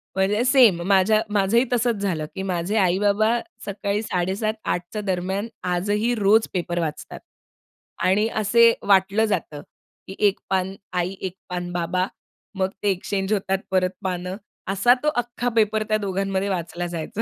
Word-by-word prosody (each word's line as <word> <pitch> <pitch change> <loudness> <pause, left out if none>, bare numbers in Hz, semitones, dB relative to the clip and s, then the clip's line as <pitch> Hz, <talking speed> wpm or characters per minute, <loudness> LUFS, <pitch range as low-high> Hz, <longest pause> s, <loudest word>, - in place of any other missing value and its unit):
म्हणजे 200 +4 +2
सेम 250 -9 +5
माझ्या 200 +2 +4
माझंही 205 +4 +3
तसंच 240 -1 +2
झालं, 170 -6 -1
की 190 - -4
माझे 185 +1 -2
आई-बाबा 205 +4 +2 0.3
सकाळी 200 +1 -2
7:30-8:00 195 +1 -1
च्या 215 - -3
दरम्यान 190 +2 -2 0.3
आजही 210 +6 0
रोज 215 +1 +4
पेपर 175 -1 -2
वाचतात. 155 -3 -4 0.8
आणि 195 +4 +3
असे 230 +2 +5
वाटलं 200 +2 +4
जातं, 160 -8 -3 0.5
की 190 - -8
एक 200 - -1
पान 190 0 0 0.2
आई, 180 +1 -1
एक 185 -1 -4
पान 175 0 -4
बाबा. 175 +1 0 0.5
मग 190 0 0
ते 205 - +3
एक्सचेंज 195 +2 -2
होतात 195 -1 0
परत 185 -1 +2
पानं. 180 0 -3 0.4
असा 220 +5 +5
तो - - 0
अख्खा 245 0 -1
पेपर 215 -1 +2
त्या 215 - +3
दोघांमध्ये 195 -1 -1
वाचला 175 -1 -3
जायचा. 175 +6 -4
195 Hz, 145 wpm, -23 LUFS, 185-215 Hz, 0.8 s, सेम